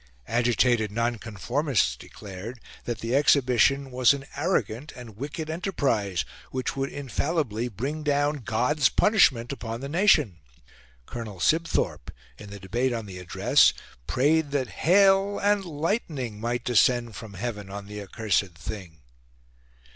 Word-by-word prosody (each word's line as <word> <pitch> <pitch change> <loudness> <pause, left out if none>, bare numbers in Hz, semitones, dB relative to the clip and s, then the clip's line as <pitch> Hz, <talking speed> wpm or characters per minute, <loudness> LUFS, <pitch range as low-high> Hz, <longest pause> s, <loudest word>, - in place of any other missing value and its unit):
Agitated 120 -2 +2
nonconformists 115 - -1
declared 100 - -9 0.3
that 120 -2 -4
the 115 +3 -1
Exhibition 135 -1 +3
was 125 +1 +4
an 135 -1 -8
arrogant 145 - -1
and 120 -4 -11
wicked 145 +6 -5
enterprise 140 - -1 0.2
which 130 -1 -3
would 135 0 -2
infallibly 140 -4 -2
bring 135 +8 -4
down 145 0 +1
God's 125 +3 +1
punishment 135 - +3
upon 115 -4 -5
the 135 - -5
nation. 150 - +3 0.7
Colonel 110 - -7
Sibthorpe, 160 - 0 0.3
in 105 - -10
the 100 0 -9
debate 120 +7 -1
on 115 -2 -4
the 95 -2 -8
Address, 90 -1 +3 0.3
prayed 150 +3 +2
that 140 -3 -1 0.2
hail 195 +1 +5
and 205 0 +2
lightning 150 - -3
might 120 +1 -2
descend 120 -1 +2
from 105 -1 -9
heaven 105 -1 -5
on 100 0 -7
the 105 +1 -7
accursed 100 -3 -1
thing. 85 -4 -8
120 Hz, 130 wpm, -26 LUFS, 105-145 Hz, 0.7 s, hail